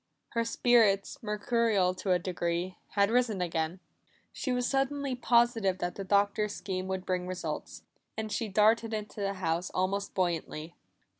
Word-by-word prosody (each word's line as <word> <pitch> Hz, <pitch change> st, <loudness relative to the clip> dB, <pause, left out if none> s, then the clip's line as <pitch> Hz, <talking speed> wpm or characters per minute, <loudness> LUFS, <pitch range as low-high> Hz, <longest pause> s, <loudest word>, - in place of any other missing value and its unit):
Her 230 Hz, -, 0 dB
spirits, 230 Hz, -4 st, +3 dB
mercurial 210 Hz, -3 st, +1 dB
to 185 Hz, +1 st, -2 dB
a 180 Hz, -, +5 dB
degree, 175 Hz, 0 st, -2 dB, 0.2 s
had 200 Hz, +1 st, +3 dB
risen 235 Hz, -5 st, +2 dB
again. 165 Hz, 0 st, -1 dB, 0.5 s
She 260 Hz, -, -3 dB
was 250 Hz, 0 st, +1 dB
suddenly 275 Hz, 0 st, 0 dB
positive 235 Hz, -6 st, +3 dB
that 175 Hz, -1 st, -2 dB
the 195 Hz, -, -5 dB
Doctor's 205 Hz, +2 st, +1 dB
scheme 185 Hz, 0 st, -4 dB
would 190 Hz, -1 st, -3 dB
bring 180 Hz, -1 st, -1 dB
results, 185 Hz, 0 st, -5 dB, 0.3 s
and 220 Hz, -1 st, -3 dB
she 220 Hz, +2 st, -1 dB
darted 220 Hz, +2 st, +3 dB
into 210 Hz, 0 st, -6 dB
the 195 Hz, 0 st, -1 dB
house 175 Hz, -1 st, -1 dB
almost 195 Hz, +2 st, -1 dB
buoyantly. 170 Hz, -3 st, -2 dB
200 Hz, 150 wpm, -30 LUFS, 185-225 Hz, 0.5 s, a